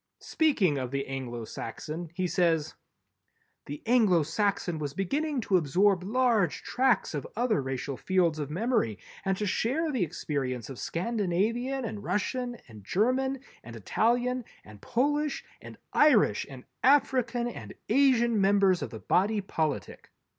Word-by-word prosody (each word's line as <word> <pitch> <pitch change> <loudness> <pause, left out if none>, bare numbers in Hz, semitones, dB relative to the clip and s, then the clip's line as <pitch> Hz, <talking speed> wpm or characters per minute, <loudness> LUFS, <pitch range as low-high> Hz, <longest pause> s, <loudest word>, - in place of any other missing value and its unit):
Speaking 205 - +1
of 130 -1 -3
the 140 +1 -2
Anglo 125 -4 -5
Saxon 155 +10 -6
he 185 0 -1
says: 165 -4 +1 0.9
"_The 145 +1 -7
Anglo 215 -9 +4
Saxon 175 0 -1
was 145 -1 -4
beginning 280 - -1
to 195 -4 +2
absorb 180 +4 +2
large 220 - +1
tracts 260 -6 +1
of 145 - -4
other 230 - +1
racial 135 0 -4
fields 175 -4 +1
of 145 -2 -3
memory 185 - 0 0.3
and 195 -1 0
to 210 - -2
share 275 - 0
the 250 -9 0
experience 135 -6 -3
of 125 - -9
Scandinavian 230 - -1
and 210 -2 -5
Russian 240 +6 -2
and 110 -4 -13
German 255 - 0 0.2
and 120 +1 -10
Italian 245 - 0 0.2
and 105 -1 -14
Polish 290 +4 0 0.2
and - - -11 0.2
Irish 245 - +4
and 130 -2 -10 0.2
African 250 -3 +3
and 240 - -8
Asian 235 -3 +3
members 195 -2 +4
of - - -3
the - - -8
body 205 +3 +2
politic. 160 -6 -3
195 Hz, 140 wpm, -28 LUFS, 150-245 Hz, 0.9 s, Anglo